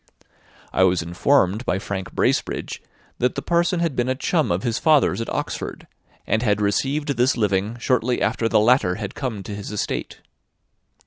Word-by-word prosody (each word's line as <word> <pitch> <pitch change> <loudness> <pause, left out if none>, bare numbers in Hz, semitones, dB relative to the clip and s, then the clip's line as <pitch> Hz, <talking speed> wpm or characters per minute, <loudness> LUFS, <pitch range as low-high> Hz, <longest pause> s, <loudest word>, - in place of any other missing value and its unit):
I 95 - +3
was 90 -2 +3
informed 95 +4 +2
by 95 - 0
Frank 95 -1 -5
Bracebridge - - -1 0.4
that 125 +1 +1
the - - -2
parson 170 +1 +1
had 165 -5 0
been 120 +1 0
a 130 - +1
chum 155 - 0
of 85 +3 -1
his 115 0 -1
father's 145 - +3
at 115 - -4
Oxford, - - -4 0.4
and 110 - +1
had 105 -4 +1
received 135 +9 0
this 125 +1 +2
living 105 +1 0
shortly 125 0 +1
after 115 - 0
the - - +4
latter 110 -5 +3
had 105 -2 -5
come 115 -8 -4
to 105 - -7
his 100 0 -6
estate. 105 - -4
115 Hz, 175 wpm, -22 LUFS, 100-130 Hz, 0.4 s, the